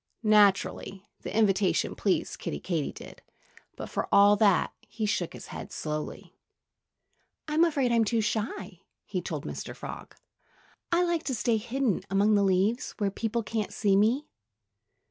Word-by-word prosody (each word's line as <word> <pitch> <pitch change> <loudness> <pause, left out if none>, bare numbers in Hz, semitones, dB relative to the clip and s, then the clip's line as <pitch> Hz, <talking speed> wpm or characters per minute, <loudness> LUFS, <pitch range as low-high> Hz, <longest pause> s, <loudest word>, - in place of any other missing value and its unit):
Naturally, 200 -2 +3 0.2
the - - -4
invitation 200 -3 +2
pleased - - -1
Kiddie 75 - -4
Katydid. 165 -6 -4 0.5
But - - -6
for - - -3
all 200 +1 +7
that, 200 -3 +3
he 220 -1 -3
shook 185 -5 -1
his - - -9
head - - -7
slowly. 150 -1 -5 1.1
"I'm 310 +2 +3
afraid 280 -7 +2
I'm 230 -1 +4
too 230 +1 +1
shy," 210 -4 -3 0.3
he 185 -3 -3
told 155 -4 -5
Mr. - - -6
Frog. - - -9 0.8
"I 345 +1 +3
like 345 -2 0
to 260 - -1
stay 235 0 +1
hidden 240 -1 -1
among 200 +3 +3
the 205 - +4
leaves, 195 +5 +1
where 205 -3 0
people 230 +3 -2
can't 215 -1 -3
see 200 -2 +2
me." 230 +9 +3
210 Hz, 145 wpm, -28 LUFS, 195-235 Hz, 1.1 s, all